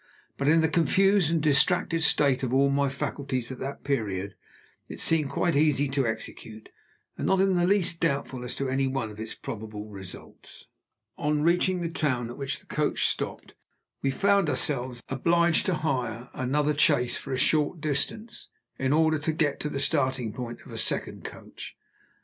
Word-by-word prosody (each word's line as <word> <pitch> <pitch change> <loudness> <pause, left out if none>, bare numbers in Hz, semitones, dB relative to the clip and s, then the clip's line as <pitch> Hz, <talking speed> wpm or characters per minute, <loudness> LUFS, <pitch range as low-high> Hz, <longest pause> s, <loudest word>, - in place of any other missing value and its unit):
But, 140 - -2
in 160 +2 +5
the 160 - +3
confused 175 +3 +3
and 165 -2 0
distracted 165 +3 +3
state 140 -4 +3
of 130 -2 -2
all 140 +1 +3
my 140 0 +2
faculties 135 -2 -3
at 130 - -7
that 140 +1 -6
period, 100 -8 -2 0.6
it - - -8
seemed 155 -4 +3
quite 170 +2 0
easy 145 -1 +3
to 135 -2 0
execute, 110 0 -6 0.5
and - - -1
not 190 - +3
in 195 0 +3
the 175 -1 +2
least 185 -4 +2
doubtful 140 -5 -1
as 125 - -4
to 135 - -2
any 135 +1 +1
one 130 -5 -2
of 105 - -12
its 110 0 -5
probable 110 -4 -7
results. 95 -2 -12 0.5
On 150 0 0
reaching 180 +2 +2
the 170 - -1
town 130 -7 -1
at - - -10
which 135 -1 -3
the - - -24
coach - - 0
stopped, - - -5 0.5
we 135 - +1
found 200 +5 +2
ourselves 125 -5 -1
obliged 170 +5 +2
to 185 - +2
hire 125 -6 -3
another 145 +4 0
chaise 140 -4 +3
for 135 - -8
a 130 - 0
short 150 +4 +2
distance, 210 +11 -2 0.3
in 135 +1 +1
order 160 0 +3
to 155 +2 0
get 155 -3 0
to 150 - -3
the 140 - -4
starting 130 -6 0
point 120 -2 -6
of - - -12
a - - -4
second - - -1
coach. - - -9
140 Hz, 180 wpm, -27 LUFS, 130-160 Hz, 0.6 s, in